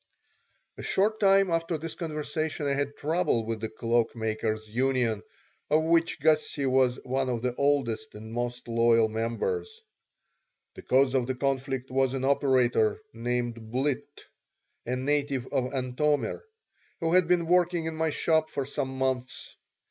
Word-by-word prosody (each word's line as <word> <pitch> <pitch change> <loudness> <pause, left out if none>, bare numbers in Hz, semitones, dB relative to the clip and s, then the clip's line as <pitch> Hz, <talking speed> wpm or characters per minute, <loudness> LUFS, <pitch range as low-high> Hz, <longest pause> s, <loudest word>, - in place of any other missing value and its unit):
A - - -4
short 215 +3 +1
time 195 -2 +4
after 165 0 0
this 165 +1 -6
conversation 155 -1 -3
I 140 - +1
had 140 +1 -2
trouble 150 -7 0
with 115 0 -3
the 110 - -3
Cloak 115 +1 0
makers' 110 -1 -2
Union, 120 -2 0 0.5
of 155 +1 +3
which 165 0 +2
Gussie 155 -2 +2
was 130 -1 +2
one 130 0 -1
of 120 -2 -2
the 125 -1 0
oldest 120 -6 0
and 110 +1 -9
most 120 +1 -3
loyal 115 -1 +3
members 435 - -3 0.9
The - - -10
cause 130 0 +3
of 130 -3 +1
the 130 - -1
conflict 135 -1 -2
was 135 0 +1
an 130 - -3
operator 130 -5 +2
named 120 -1 -3
Blitt, 130 +3 -2 0.6
a 125 - 0
native 140 -1 0
of 125 -1 0
Antomir, 135 +3 0 0.6
who 165 0 0
had 180 -2 +5
been 175 -1 +2
working 175 -1 +2
in 160 0 -3
my 160 0 0
shop 160 +1 +1
for 140 - -3
some 130 -1 -3
months. 130 -1 -2
130 Hz, 150 wpm, -28 LUFS, 120-155 Hz, 0.9 s, had